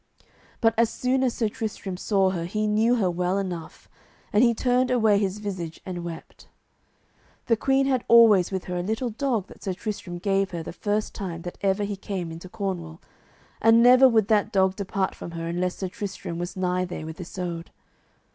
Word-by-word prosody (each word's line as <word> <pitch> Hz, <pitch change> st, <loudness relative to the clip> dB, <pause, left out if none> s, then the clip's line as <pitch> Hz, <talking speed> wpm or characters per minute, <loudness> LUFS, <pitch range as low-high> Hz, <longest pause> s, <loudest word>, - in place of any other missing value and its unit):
But 225 Hz, -2 st, +4 dB
as 230 Hz, -1 st, +4 dB
soon 255 Hz, +3 st, 0 dB
as 250 Hz, -3 st, +1 dB
Sir 225 Hz, -, +1 dB
Tristram 210 Hz, -3 st, -5 dB
saw 190 Hz, 0 st, +1 dB
her 170 Hz, -3 st, -3 dB
he 215 Hz, +4 st, -1 dB
knew 220 Hz, +3 st, +3 dB
her 195 Hz, -7 st, +1 dB
well 180 Hz, +2 st, 0 dB
enough, 180 Hz, -5 st, -5 dB, 0.5 s
and 210 Hz, +3 st, +5 dB
he 235 Hz, -, +5 dB
turned 250 Hz, +2 st, +2 dB
away 220 Hz, -5 st, +3 dB
his 195 Hz, -1 st, -1 dB
visage 185 Hz, -6 st, -5 dB
and 175 Hz, -2 st, -5 dB
wept. 170 Hz, -1 st, -9 dB, 1.0 s
The 230 Hz, -, +3 dB
queen 270 Hz, +4 st, +2 dB
had 260 Hz, -3 st, +1 dB
always 220 Hz, -6 st, +6 dB
with 190 Hz, -1 st, -2 dB
her 180 Hz, 0 st, -4 dB
a -, -, -1 dB
little 220 Hz, +6 st, -2 dB
dog 235 Hz, -4 st, -1 dB
that -, -, -16 dB
Sir 190 Hz, -, -2 dB
Tristram 185 Hz, -3 st, -5 dB
gave 195 Hz, +1 st, +1 dB
her 170 Hz, -3 st, -5 dB
the -, -, -7 dB
first 210 Hz, +3 st, -2 dB
time 170 Hz, -4 st, -5 dB
that 175 Hz, -, -7 dB
ever 195 Hz, +1 st, +1 dB
she 200 Hz, 0 st, -3 dB
came 190 Hz, -3 st, -5 dB
into 165 Hz, +3 st, -9 dB
Cornwall, 180 Hz, -6 st, -4 dB, 0.6 s
and 225 Hz, +1 st, +6 dB
never 255 Hz, +2 st, +8 dB
would 220 Hz, -4 st, +3 dB
that 215 Hz, -1 st, +2 dB
dog 190 Hz, -2 st, +2 dB
depart 195 Hz, -1 st, -2 dB
from -, -, -8 dB
her 165 Hz, -, -4 dB
unless 180 Hz, +2 st, -1 dB
Sir 190 Hz, -, -3 dB
Tristram 190 Hz, -4 st, -6 dB
was 175 Hz, +2 st, -5 dB
nigh 180 Hz, 0 st, 0 dB
there 175 Hz, -3 st, -5 dB
with 160 Hz, +3 st, -7 dB
Isoud. 175 Hz, -1 st, -5 dB
195 Hz, 195 wpm, -25 LUFS, 180-225 Hz, 1.0 s, never